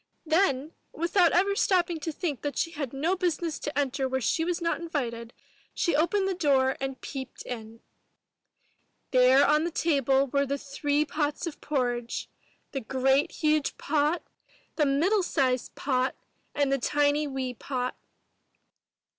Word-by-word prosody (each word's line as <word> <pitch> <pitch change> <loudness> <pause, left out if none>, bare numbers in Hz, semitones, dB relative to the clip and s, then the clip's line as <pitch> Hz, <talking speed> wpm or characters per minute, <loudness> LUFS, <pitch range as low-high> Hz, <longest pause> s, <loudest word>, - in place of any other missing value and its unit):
Then, 315 -4 +2 0.2
without 340 +2 +3
ever 395 +3 +3
stopping 355 -5 +2
to 320 +2 -3
think 305 -3 -3
that 290 -1 -3
she 330 - 0
had 290 -6 -4
no 315 +7 0
business 340 -5 -1
to 295 -1 -5
enter 270 -1 0
where 260 0 0
she 260 +7 +1
was 350 +1 -1
not 335 -1 -1
invited, 235 -9 -3 0.4
she 340 - +1
opened 385 +6 +2
the 385 - 0
door 270 -6 +2
and 270 -1 -3
peeped 265 -2 -7
in. 225 -2 -8 1.3
There 255 +2 +6
on 300 +1 +3
the 340 - 0
table 275 -5 +2
were 280 +1 0
the 280 +1 -1
three 285 +2 -1
pots 295 +1 -2
of 330 -3 -6
porridge, 245 -5 -2 0.2
— - - -39
the 270 - -3
great 265 +4 +2
huge 305 -2 0
pot, 305 +3 0 0.5
the 300 -3 +2
middle 345 +10 +3
sized 255 -7 0
pot, 260 -1 0 0.4
and 285 -1 +1
the 275 - +2
tiny 290 +3 +2
wee 265 -2 -3
pot. 250 0 -3
285 Hz, 155 wpm, -28 LUFS, 265-330 Hz, 1.3 s, There